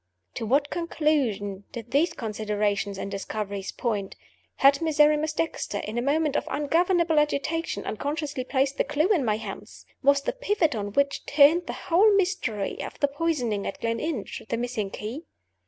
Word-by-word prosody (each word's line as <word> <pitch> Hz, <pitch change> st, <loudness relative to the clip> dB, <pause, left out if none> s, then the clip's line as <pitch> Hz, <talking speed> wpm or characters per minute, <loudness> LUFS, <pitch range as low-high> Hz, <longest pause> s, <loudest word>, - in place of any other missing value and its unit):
To 225 Hz, -, -4 dB
what 280 Hz, +5 st, +2 dB
conclusion 260 Hz, -, 0 dB
did 235 Hz, -1 st, -8 dB
these 320 Hz, +5 st, +3 dB
considerations 210 Hz, -, -2 dB
and 195 Hz, -, -5 dB
discoveries 200 Hz, 0 st, -4 dB
point? 210 Hz, -5 st, -3 dB, 0.4 s
Had 275 Hz, +2 st, +5 dB
Miserrimus 305 Hz, -1 st, +3 dB
Dexter, 325 Hz, -10 st, -2 dB
in 210 Hz, +2 st, -5 dB
a 240 Hz, -, 0 dB
moment 295 Hz, +2 st, +1 dB
of -, -, 0 dB
ungovernable 330 Hz, +2 st, +2 dB
agitation, 300 Hz, +3 st, -1 dB
unconsciously 285 Hz, +3 st, -3 dB
placed 270 Hz, +1 st, 0 dB
the -, -, +4 dB
clew 295 Hz, +6 st, +1 dB
in 360 Hz, -10 st, +3 dB
my 215 Hz, -3 st, +1 dB
hands? 225 Hz, -, -9 dB, 0.2 s
Was 280 Hz, 0 st, +4 dB
the -, -, -1 dB
pivot 415 Hz, -, +1 dB
on 205 Hz, -3 st, -4 dB
which 280 Hz, +2 st, +1 dB
turned 305 Hz, +4 st, +5 dB
the -, -, -3 dB
whole 390 Hz, +6 st, +3 dB
mystery 360 Hz, -, -1 dB
of -, -, -7 dB
the 285 Hz, -, +3 dB
poisoning 275 Hz, -9 st, -1 dB
at -, -, -5 dB
Gleninch 230 Hz, +2 st, -3 dB
the 230 Hz, -, 0 dB
missing 235 Hz, -4 st, -2 dB
key? 235 Hz, -, -6 dB
280 Hz, 160 wpm, -26 LUFS, 215-315 Hz, 0.4 s, Had